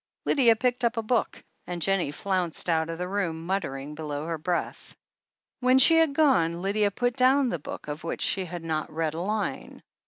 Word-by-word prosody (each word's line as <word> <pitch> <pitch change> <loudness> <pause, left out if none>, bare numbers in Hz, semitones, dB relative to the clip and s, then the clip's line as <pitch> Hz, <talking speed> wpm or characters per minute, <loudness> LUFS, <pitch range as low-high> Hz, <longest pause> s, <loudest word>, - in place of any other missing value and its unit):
Lydia 240 -5 +4
picked 250 +2 -1
up 235 0 +1
a 225 - -1
book, 230 0 -1 0.2
and 175 -1 -4
Jennie 195 -2 +1
flounced 180 +2 -2
out 160 0 +1
of 165 - -4
the 180 +1 -3
room, 175 -5 -2
muttering 150 -7 -3
below 150 -1 -5
her 165 -1 -3
breath. 175 +2 -3 0.6
When 255 +1 +4
she 325 +5 +6
had 320 -4 +3
gone 175 - +3
Lydia 205 +1 +1
put 245 +4 -1
down 265 +1 +4
the 175 - -2
book, 145 - -8
of 150 +1 -6
which 165 - -3
she 190 -2 0
had 175 -1 -7
not 155 -2 -3
read 160 0 -2
a 165 - -4
line. 210 +2 -3
185 Hz, 195 wpm, -26 LUFS, 160-235 Hz, 0.6 s, she